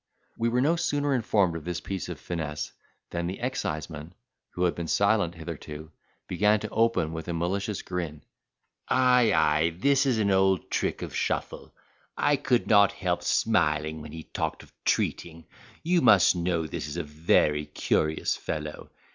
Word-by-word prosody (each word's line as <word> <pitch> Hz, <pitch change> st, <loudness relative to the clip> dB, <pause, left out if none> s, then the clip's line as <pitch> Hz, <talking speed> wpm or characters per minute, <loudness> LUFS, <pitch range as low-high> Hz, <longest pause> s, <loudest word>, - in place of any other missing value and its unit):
We 115 Hz, +1 st, 0 dB
were 125 Hz, +2 st, +1 dB
no 160 Hz, +5 st, +2 dB
sooner 145 Hz, -3 st, 0 dB
informed 105 Hz, -8 st, +2 dB
of 80 Hz, -, -6 dB
this 90 Hz, +1 st, -3 dB
piece 95 Hz, +1 st, -5 dB
of -, -, -6 dB
finesse, 75 Hz, -3 st, -4 dB, 0.4 s
than 85 Hz, 0 st, -2 dB
the 95 Hz, +2 st, -5 dB
exciseman, 80 Hz, -, -4 dB, 0.3 s
who 90 Hz, -, -3 dB
had 90 Hz, -, +2 dB
been 85 Hz, -1 st, -5 dB
silent 100 Hz, +1 st, +2 dB
hitherto, 80 Hz, -1 st, -8 dB, 0.4 s
began 105 Hz, +4 st, +2 dB
to 110 Hz, -, -4 dB
open 115 Hz, -8 st, +1 dB
with 80 Hz, 0 st, -6 dB
a 85 Hz, -, -2 dB
malicious 95 Hz, +5 st, -2 dB
grin: 85 Hz, -5 st, -5 dB, 0.6 s
"Ay, 125 Hz, -3 st, +4 dB
ay 80 Hz, -1 st, +3 dB
this 140 Hz, +6 st, +3 dB
is 125 Hz, -4 st, +2 dB
an 100 Hz, -2 st, +2 dB
old 95 Hz, -1 st, +2 dB
trick -, -, -1 dB
of -, -, -6 dB
Shuffle; -, -, -3 dB, 0.5 s
I 145 Hz, -, +3 dB
could 130 Hz, -3 st, +1 dB
not 100 Hz, -2 st, +5 dB
help 90 Hz, -1 st, -1 dB
smiling 75 Hz, +1 st, +1 dB
when 75 Hz, -1 st, -9 dB
he 80 Hz, 0 st, -8 dB
talked -, -, -4 dB
of -, -, -20 dB
treating. 80 Hz, -1 st, -1 dB, 0.4 s
You 175 Hz, +1 st, +2 dB
must 100 Hz, -, +6 dB
know 85 Hz, -2 st, 0 dB
this 75 Hz, -, -5 dB
is 75 Hz, +3 st, -6 dB
a 85 Hz, -, -1 dB
very 75 Hz, -1 st, +1 dB
curious 75 Hz, +1 st, 0 dB
fellow. 75 Hz, -1 st, -5 dB
90 Hz, 165 wpm, -27 LUFS, 80-110 Hz, 0.6 s, must